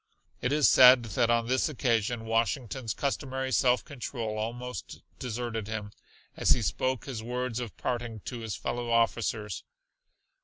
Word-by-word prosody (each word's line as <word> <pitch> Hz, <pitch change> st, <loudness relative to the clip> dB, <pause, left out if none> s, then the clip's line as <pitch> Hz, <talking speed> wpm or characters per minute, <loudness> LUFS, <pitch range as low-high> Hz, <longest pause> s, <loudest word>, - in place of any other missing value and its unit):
It 125 Hz, -, 0 dB
is 150 Hz, -1 st, +4 dB
said 125 Hz, -1 st, +8 dB
that 115 Hz, +1 st, 0 dB
on 115 Hz, 0 st, +3 dB
this 130 Hz, +5 st, +1 dB
occasion 120 Hz, -4 st, 0 dB
Washington's 115 Hz, +1 st, -1 dB
customary 130 Hz, -2 st, -2 dB
self 125 Hz, -1 st, +3 dB
control 115 Hz, -5 st, -4 dB
almost 120 Hz, -1 st, -5 dB, 0.2 s
deserted 115 Hz, -3 st, -3 dB
him, 105 Hz, -2 st, -4 dB, 0.4 s
as -, -, +4 dB
he -, -, -3 dB
spoke 130 Hz, -1 st, -1 dB
his 125 Hz, -5 st, -5 dB
words 125 Hz, 0 st, -3 dB
of 120 Hz, -4 st, -6 dB
parting 120 Hz, -3 st, -3 dB
to 120 Hz, +3 st, -6 dB
his 110 Hz, -3 st, -4 dB
fellow 120 Hz, 0 st, -3 dB
officers. 115 Hz, -3 st, 0 dB
120 Hz, 145 wpm, -29 LUFS, 115-125 Hz, 0.4 s, said